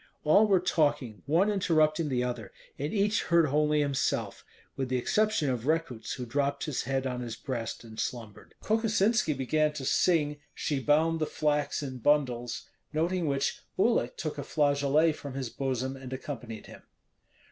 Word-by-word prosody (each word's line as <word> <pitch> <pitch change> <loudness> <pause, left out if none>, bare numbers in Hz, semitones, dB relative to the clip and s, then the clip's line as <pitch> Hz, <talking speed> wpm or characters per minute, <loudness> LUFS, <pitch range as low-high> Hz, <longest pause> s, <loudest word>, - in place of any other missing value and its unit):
All 200 +8 +5
were 195 -3 +4
talking, 145 - 0
one 175 +8 +3
interrupting 155 -5 +2
the 125 -2 0
other; 120 -5 -4 0.3
and 145 +3 -2
each 205 +1 +2
heard 170 -1 +4
only 150 +1 +2
himself, 140 -2 -1 0.3
with 135 -2 -3
the 130 - +1
exception 215 - +1
of 125 0 -3
Rekuts, 155 -8 -1
who 125 - -5
dropped 140 +3 -1
his 150 -6 -2
head 135 +1 -1
on 125 -1 -2
his 115 -2 -5
breast 120 -1 -5
and 110 -1 -10
slumbered. 115 -4 -5
Kokosinski 220 -4 +2
began 150 +3 +1
to 140 -3 -5
sing, 150 -1 +2 0.2
"She 145 -3 -1
bound 160 +4 +2
the 155 - 0
flax 150 -1 0
in 130 -2 -5
bundles," 125 -3 +1 0.2
noting 170 +2 0
which 140 -1 -1 0.2
Uhlik 190 - +2
took 155 -2 -4
a - - -3
flageolet 145 +2 +2
from 140 -3 -8
his 130 -4 -4
bosom 130 -1 -2
and 130 -1 -9
accompanied 120 -5 -6
him. - - -12
145 Hz, 165 wpm, -29 LUFS, 130-160 Hz, 0.3 s, All